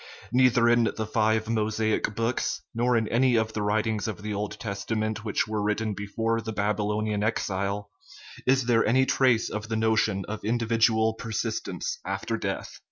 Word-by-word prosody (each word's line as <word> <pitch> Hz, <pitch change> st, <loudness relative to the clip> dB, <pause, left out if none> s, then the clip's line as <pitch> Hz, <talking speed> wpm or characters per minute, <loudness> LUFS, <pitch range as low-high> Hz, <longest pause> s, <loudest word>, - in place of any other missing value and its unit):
Neither 125 Hz, -1 st, +4 dB
in 120 Hz, 0 st, +4 dB
the 110 Hz, 0 st, -2 dB
" 110 Hz, -, -16 dB
five 110 Hz, 0 st, +2 dB
Mosaic 110 Hz, -1 st, 0 dB
books/' 115 Hz, +2 st, -1 dB
nor 120 Hz, +1 st, +2 dB
in 110 Hz, -1 st, 0 dB
any 125 Hz, +1 st, +3 dB
of 110 Hz, -1 st, +1 dB
the 105 Hz, -, -2 dB
writings 105 Hz, +1 st, 0 dB
of 105 Hz, -1 st, -5 dB
the 105 Hz, 0 st, -3 dB
Old 105 Hz, +1 st, -4 dB
Testament 110 Hz, +1 st, -3 dB
which 105 Hz, -2 st, 0 dB
were 110 Hz, -1 st, -2 dB
written 105 Hz, +1 st, 0 dB
before 115 Hz, +3 st, -1 dB
the 110 Hz, 0 st, -5 dB
Babylonian 105 Hz, 0 st, -1 dB
Exile, 100 Hz, -2 st, -1 dB, 0.6 s
is 130 Hz, 0 st, +4 dB
there 115 Hz, -2 st, +3 dB
any 130 Hz, +4 st, +3 dB
trace 130 Hz, -4 st, +3 dB
of 105 Hz, +1 st, -5 dB
the 110 Hz, -, -1 dB
notion 110 Hz, -3 st, +1 dB
of 110 Hz, +1 st, -5 dB
individual 115 Hz, 0 st, +2 dB
persistence 115 Hz, -, -3 dB
after -, -, -2 dB
death. -, -, -4 dB
110 Hz, 165 wpm, -27 LUFS, 105-115 Hz, 0.6 s, Neither